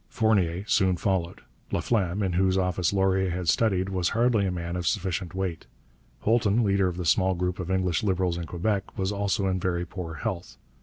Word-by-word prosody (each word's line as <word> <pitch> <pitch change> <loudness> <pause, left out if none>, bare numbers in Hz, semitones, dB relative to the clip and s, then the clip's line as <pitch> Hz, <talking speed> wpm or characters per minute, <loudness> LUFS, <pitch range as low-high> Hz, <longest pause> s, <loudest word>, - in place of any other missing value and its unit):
Fournier 100 -6 +1
soon 95 -4 +2
followed. 90 -3 -1 0.3
Laflamme, 100 -3 0
in 95 -2 -1
whose 95 +1 +2
office 90 -2 +1
Laurier 95 -1 +2
had 90 0 -3
studied, 95 +1 +2
was 90 -2 0
hardly 115 -4 +3
a - - -1
man 85 -1 -4
of 90 -2 -2
sufficient 95 -1 -2
weight. 95 -3 -3 0.5
Holton, 110 0 +2
leader 100 -2 +2
of 90 -1 -4
the 90 - -3
small 95 +3 +3
group 90 +1 -2
of 90 -1 -4
English 95 -3 +1
Liberals 95 -3 0
in 85 - -4
Quebec, 100 +3 -2
was 95 +1 0
also 100 0 0
in 95 -1 0
very 90 -1 -1
poor 85 -2 -6
health. 95 -3 -5
95 Hz, 190 wpm, -26 LUFS, 90-100 Hz, 0.5 s, hardly